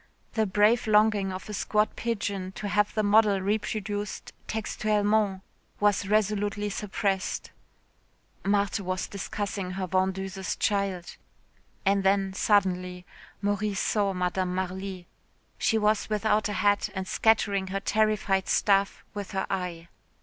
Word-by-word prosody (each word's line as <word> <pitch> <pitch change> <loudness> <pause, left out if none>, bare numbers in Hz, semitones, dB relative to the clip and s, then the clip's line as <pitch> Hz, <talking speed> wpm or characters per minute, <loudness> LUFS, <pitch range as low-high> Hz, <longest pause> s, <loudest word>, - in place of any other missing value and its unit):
The 220 -2 +1
brave 210 +4 +3
longing 210 -2 +3
of 185 0 -7
a 210 - -6
squat 210 +1 +1
pigeon 200 -5 -3
to 210 - -5
have 205 +2 +2
the 215 - +1
model 205 -1 +4
reproduced 205 +1 -3
"textuellement" 210 -2 0 0.4
was 205 -1 +2
resolutely 205 0 +1
suppressed. 195 -2 -2 0.9
Marthe 200 +1 +1
was 185 -1 -2
discussing 200 -1 -4
her 190 0 -2
vendeuse's 190 +1 -1
child.... 195 -4 -1 0.7
And 195 0 +3
then 195 0 +2
suddenly 180 -3 +1 0.4
Maurice 205 0 0
saw 205 -2 +1
Madame 180 0 -1
Marly. 190 0 -4 0.5
She 225 - +2
was 215 0 +1
without 215 0 +1
a - - -2
hat 205 0 +2
and 190 0 -3
scattering 200 -3 +2
her 195 +1 -2
terrified 210 -2 +1
staff 200 -1 +2
with 205 -2 -6
her 190 0 0
eye. 180 -3 -3
200 Hz, 125 wpm, -27 LUFS, 190-210 Hz, 0.9 s, model